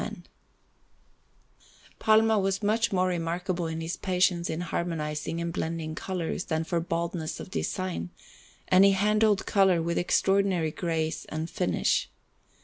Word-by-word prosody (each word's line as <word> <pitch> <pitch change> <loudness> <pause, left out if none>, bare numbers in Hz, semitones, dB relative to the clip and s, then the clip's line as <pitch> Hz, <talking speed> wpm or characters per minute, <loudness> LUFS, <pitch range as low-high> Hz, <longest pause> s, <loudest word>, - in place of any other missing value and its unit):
Panel_)] - - -6 1.8
Palma 220 0 +4
was 195 +1 -1
much 220 +3 +2
more 185 -1 +2
remarkable 175 0 -2
for 160 - -4
his 165 +1 -4
patience 180 -2 +1
in 160 +2 -2
harmonizing 165 -2 -3
and 170 0 -3
blending 160 -1 -3
colours 175 0 -3
than 160 -1 -1
for 170 +1 -1
boldness 165 -1 -3
of - - -9
design, 185 - -3 0.6
and 185 +1 +6
he 195 0 +6
handled 210 +1 +2
colour 190 -3 +3
with 170 +1 -1
extraordinary 185 -2 +2
grace 160 -1 -2
and 160 +2 -5
finish. 180 0 0
175 Hz, 135 wpm, -27 LUFS, 165-195 Hz, 1.8 s, and